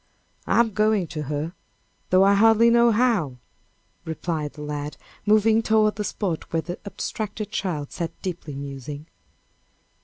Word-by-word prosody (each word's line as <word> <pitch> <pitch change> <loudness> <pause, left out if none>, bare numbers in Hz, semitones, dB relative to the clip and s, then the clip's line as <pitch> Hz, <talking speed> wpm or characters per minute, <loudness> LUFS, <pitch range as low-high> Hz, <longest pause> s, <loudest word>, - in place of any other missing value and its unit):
"I'm 235 -1 +3
going 215 -2 +2
to 155 - -4
her, 150 +3 -2 0.6
though 185 +1 +5
I 200 +1 +5
hardly 225 +3 +5
know 235 0 +5
how," 215 - +2 0.7
replied 160 -2 -3
the 150 - -9
lad, 150 0 -4 0.3
moving 215 +1 +5
toward 215 -2 +2
the 210 - -1
spot 190 -5 -3
where 165 -1 0
the 175 0 -6
abstracted 215 0 -4
child 170 -9 -3
sat 170 -2 -5
deeply 170 -6 -5
musing. 140 +1 -7
185 Hz, 140 wpm, -24 LUFS, 150-215 Hz, 0.7 s, though